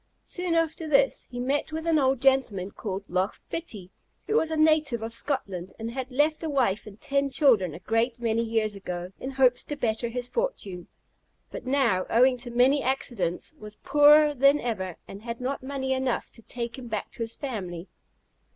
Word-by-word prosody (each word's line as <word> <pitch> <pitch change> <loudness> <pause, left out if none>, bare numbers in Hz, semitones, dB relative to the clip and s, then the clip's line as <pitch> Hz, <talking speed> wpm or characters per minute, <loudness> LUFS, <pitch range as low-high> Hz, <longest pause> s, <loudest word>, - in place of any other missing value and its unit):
Soon 360 -2 -2
after 325 0 0
this 275 -2 +2
he 245 - -6
met 275 +5 -1
with 320 +1 -4
an 325 -2 +3
old 265 -2 +2
gentleman, 240 -8 +2
called 195 -2 -5
Loch 185 +3 0
Fitty, 210 - -6 0.3
who 430 - -1
was 320 -8 +3
a 320 - -2
native 310 -7 +3
of 225 +1 -5
Scotland, 200 -9 -3
and 225 +1 -5
had 260 +1 -4
left 295 +4 +1
a 320 - -3
wife 240 -8 +1
and 210 0 -12
ten 280 0 0
children 225 - +3
a - - -8
great 230 +4 0
many 230 -1 +1
years 225 -2 0
ago, 180 -2 -5
in 260 - -5
hopes 260 -2 +3
to 295 - -4
better 235 -3 -1
his 245 +1 -4
fortune; 205 - -3 0.6
but 250 - -7
now, 250 -9 +2
owing 250 +3 +5
to 240 0 -7
many 255 +4 +3
accidents, 240 - -1
was 210 0 -9
poorer 295 +3 +6
than 275 +2 +4
ever, 190 - -3
and 195 - -9
had 235 0 -6
not 260 +2 -3
money 265 0 -2
enough 260 -2 -1
to 230 - -13
take 235 +2 -5
him 245 - -8
back 215 -2 -4
to - - -16
his 225 0 -3
family. 190 - -5
250 Hz, 190 wpm, -27 LUFS, 215-280 Hz, 0.6 s, poorer